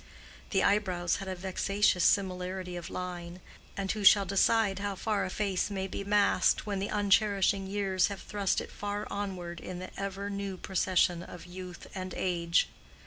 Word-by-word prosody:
The 195 - +2
eyebrows 185 -4 +2
had 195 - -6
a 190 - -3
vexatious 190 0 +1
similarity 185 -1 +1
of 175 -1 -6
line; 180 -1 -5 0.4
and 195 -1 -1
who 215 -2 -3
shall 200 0 +7
decide 200 0 +3
how 200 -1 -2
far 210 +1 0
a - - -3
face 195 -1 -1
may 195 -2 -2
be 195 +1 -4
masked 205 0 +3
when 200 -2 -2
the 200 - -2
uncherishing 200 -1 +2
years 195 -2 +1
have 200 -1 -6
thrust 200 -2 0
it - - -9
far 205 +1 -4
onward 180 -4 -4
in 180 +1 -6
the 185 +1 -7
ever 200 0 -3
new 200 -1 -4
procession 180 -2 +1
of 175 0 -10
youth 180 0 -9
and 185 -1 -5
age? 170 -2 +2
195 Hz, 170 wpm, -30 LUFS, 180-200 Hz, 0.4 s, shall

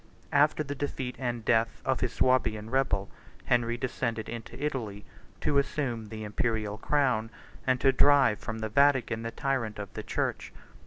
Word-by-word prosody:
After 150 +1 +4
the 145 -1 -4
defeat 135 -2 -4
and 120 -3 -3
death 115 0 +2
of 130 -1 +1
his 125 - 0
Swabian 115 -4 +1
rebel, 125 -7 +1 0.4
Henry 120 -1 +2
descended 120 -3 -2
into 115 +2 -7
Italy, 115 -9 -3 0.4
to 140 - +3
assume 130 -6 -2
the 110 0 -6
Imperial 105 0 -1
crown, 125 -5 +1 0.4
and 130 -1 +3
to 135 - +5
drive 135 -5 +5
from 110 - -5
the 110 0 -3
Vatican 130 -2 +3
the 115 - -3
tyrant 130 -5 -2
of 100 -2 -7
the - - -4
church. - - -2
120 Hz, 160 wpm, -29 LUFS, 110-135 Hz, 0.4 s, to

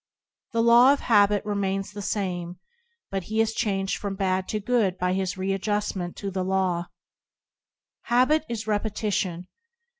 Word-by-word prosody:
The 230 0 +2
law 240 +3 +7
of 285 - -3
habit 205 -2 +3
remains 195 -1 -2
the 205 0 -7
same, 180 -4 -3 0.5
but 195 -2 -3
he 220 +3 -2
is 225 0 +2
changed 195 -4 -1
from 200 -1 -4
bad 190 -1 0
to 215 - -2
good 210 -4 +1
by 180 0 0
his 190 -1 -2
read 195 0 -1
justment 205 -4 -2
to 200 -1 -5
the 190 -1 -2
law. 185 -2 0 1.2
Habit 255 +6 +3
is 225 -2 -4
repetition. 205 -4 -2
200 Hz, 150 wpm, -25 LUFS, 190-220 Hz, 1.2 s, law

